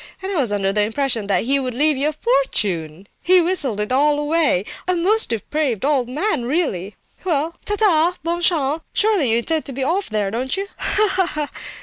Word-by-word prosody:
And 385 +1 -5
I 385 - -2
was 245 -6 +1
under 195 -1 0
the 210 - +2
impression 225 0 0
that 200 - +1
he 275 +4 +1
would 255 -3 -4
leave 300 +3 +2
you 280 +3 0
a - - -5
fortune! 200 - -1 0.2
He's 365 0 +4
whistled 290 - +1
it 210 +3 -2
all 290 +3 +3
away. 295 - +1 0.2
A 365 - +1
most 405 +6 +2
depraved 240 +1 -2
old 275 -4 +1
gentleman, 295 - -1
really! 240 - -2 0.3
Well, 330 -1 -1
ta, 415 - 0
ta!—bonne 345 -3 +1
chance! 315 -3 +1
Surely 410 - +2
you 225 - +4
intend 315 +6 0
to 275 - -4
be 265 +1 -4
off 355 +8 -1
there, 210 -2 -1
don't 255 - -2
you? 390 - -2
Ha, 390 -3 +2
ha! 300 -1 -3
285 Hz, 200 wpm, -20 LUFS, 235-340 Hz, 0.3 s, He's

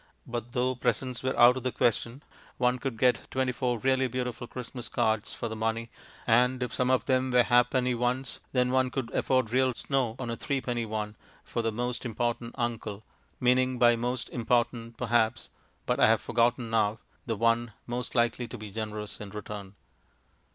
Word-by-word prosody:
But 120 0 -5
though 130 0 +1
presents 125 0 -1
were 130 0 -1
out 120 +2 +8
of - - -3
the 130 +1 -1
question, 120 +4 0 0.3
one 125 0 +2
could 135 -4 -3
get 125 +2 +2
twenty 130 -1 0
four 125 -1 -1
really 130 +2 +2
beautiful 125 -1 -4
Christmas 125 0 -7
cards 110 -1 0
for 115 - -3
the 110 - -5
money, 115 +1 -2 0.3
and 125 +2 +3
if 125 - -4
some 125 0 +1
of 130 -1 +2
them 130 -1 +2
were 125 -1 +5
ha'penny 125 +1 +3
ones, 125 +2 -1
then 125 -1 +2
one 130 0 +3
could 130 -2 -4
afford 130 -4 +1
real 130 -1 +3
snow 130 -5 -1
on 120 -2 -4
a - - -2
threepenny 120 -4 -2
one 105 -1 -3 0.3
for 120 - -2
the 115 0 0
most 120 +2 -2
important 120 0 -2
uncle, 115 -4 -3 0.4
meaning 130 +1 +3
by 120 0 +6
"most 120 +1 -2
important," 115 -1 0
perhaps 115 -2 +1 0.4
(but - - 0
I - - +7
have - - +4
forgotten 120 0 +1
now), 110 -1 +2 0.3
the 115 - 0
one 115 +1 +1
most 120 +2 -4
likely 120 0 +1
to - - -7
be 105 -1 -8
generous 105 0 -5
in 105 - -6
return. 105 -1 -7
120 Hz, 180 wpm, -29 LUFS, 115-125 Hz, 0.4 s, out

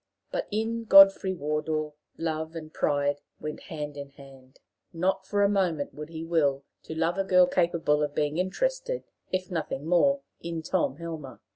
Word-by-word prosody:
But - - -2
in 225 +2 -2
Godfrey 195 -2 +7
Wardour 150 0 -2 0.2
love 160 0 -3
and 155 -1 -8
pride 145 0 0 0.2
went 150 0 -5
hand 150 -4 -6
in 140 -1 -7
hand. 135 -2 -16 0.3
Not 190 +3 -1
for 205 0 +2
a - - +5
moment 180 -7 0
would 150 +1 -8
he 160 -1 -6
will 145 -5 +1 0.2
to 160 - -6
love 165 +3 0
a - - +3
girl 180 -1 +5
capable 170 -4 +1
of 145 -1 -2
being 150 +2 0
interested, - - -1 0.3
if 185 0 -2
nothing 155 -4 -3
more, 275 - +3 0.2
in 165 -1 -4
Tom 165 -6 0
Helmer. 160 -4 -7
165 Hz, 165 wpm, -27 LUFS, 150-190 Hz, 0.3 s, Godfrey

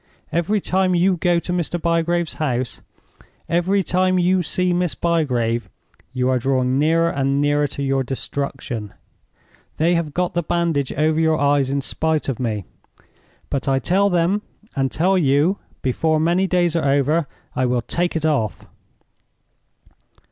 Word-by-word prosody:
Every 175 +6 +1
time 185 -1 +1
you 180 +2 +3
go 175 0 +1
to 175 +1 -3
Mr. 175 0 -1
Bygrave's 170 0 0
house, 130 -4 -2 0.7
every 180 +4 +1
time 185 +1 +1
you 180 +1 +3
see 180 +1 0
Miss 175 -2 0
Bygrave, 125 -9 0 0.4
you 125 -1 -1
are 130 -1 +2
drawing 130 +1 +1
nearer 165 +2 +3
and 140 -1 0
nearer 145 0 +2
to 140 0 -5
your 135 0 +1
destruction. 130 -4 -4 0.8
They 165 +3 +2
have 165 -4 -1
got 180 -1 0
the 175 - +1
bandage 165 -5 0
over 155 +2 +1
your 160 -1 +3
eyes 140 -1 +2
in 140 +1 0
spite 160 +2 -1
of 130 - -3
me; 110 -6 -2 0.9
but 140 -1 -2
I 135 -1 +3
tell 190 +9 +2
them, 180 +3 +1 0.3
and 135 -1 0
tell 185 +4 +2
you, 150 +5 +2 0.2
before 155 +5 +1
many 175 +4 +2
days 175 -2 +1
are 155 -4 +1
over 145 +3 +2 0.3
I 130 0 +1
will 120 -1 0
take 175 +7 -1
it 160 -1 0
off!" 135 -9 -1
160 Hz, 155 wpm, -21 LUFS, 135-175 Hz, 0.9 s, you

